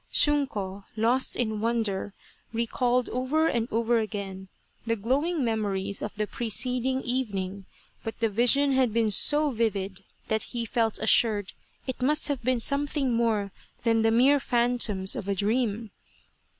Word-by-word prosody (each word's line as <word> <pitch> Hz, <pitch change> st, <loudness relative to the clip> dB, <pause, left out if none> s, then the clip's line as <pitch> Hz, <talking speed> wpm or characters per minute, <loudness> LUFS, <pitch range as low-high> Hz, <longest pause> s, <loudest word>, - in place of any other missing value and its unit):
Shunko, 210 Hz, -10 st, +1 dB
lost 235 Hz, +4 st, +2 dB
in 220 Hz, -3 st, -1 dB
wonder, 220 Hz, -4 st, -1 dB, 0.4 s
recalled 240 Hz, +2 st, 0 dB
over 260 Hz, +6 st, 0 dB
and 235 Hz, -7 st, 0 dB
over 230 Hz, +1 st, +2 dB
again 200 Hz, -3 st, -5 dB, 0.4 s
the 230 Hz, 0 st, 0 dB
glowing 275 Hz, -, 0 dB
memories 200 Hz, -3 st, -1 dB
of 210 Hz, -, -5 dB
the 210 Hz, 0 st, -1 dB
preceding 250 Hz, +4 st, -1 dB
evening, 200 Hz, -6 st, -2 dB, 0.4 s
but 225 Hz, -, -6 dB
the 230 Hz, -, +2 dB
vision 245 Hz, +6 st, +3 dB
had 260 Hz, -4 st, +2 dB
been 225 Hz, -2 st, +2 dB
so 295 Hz, +9 st, +4 dB
vivid 200 Hz, -5 st, -2 dB, 0.2 s
that 220 Hz, 0 st, 0 dB, 0.2 s
he 235 Hz, -, -1 dB
felt 225 Hz, -1 st, 0 dB
assured 215 Hz, -2 st, +2 dB, 0.3 s
it 260 Hz, -1 st, -5 dB
must 300 Hz, +4 st, +2 dB
have 275 Hz, -4 st, -2 dB
been 255 Hz, 0 st, +1 dB
something 280 Hz, 0 st, 0 dB
more 220 Hz, -4 st, 0 dB, 0.3 s
than 225 Hz, -1 st, +2 dB
the 225 Hz, -, +3 dB
mere 260 Hz, +6 st, +4 dB
phantoms 235 Hz, -7 st, +1 dB
of 195 Hz, -, -5 dB
a 200 Hz, -, +1 dB
dream. 220 Hz, +1 st, -1 dB
230 Hz, 145 wpm, -27 LUFS, 210-255 Hz, 0.4 s, so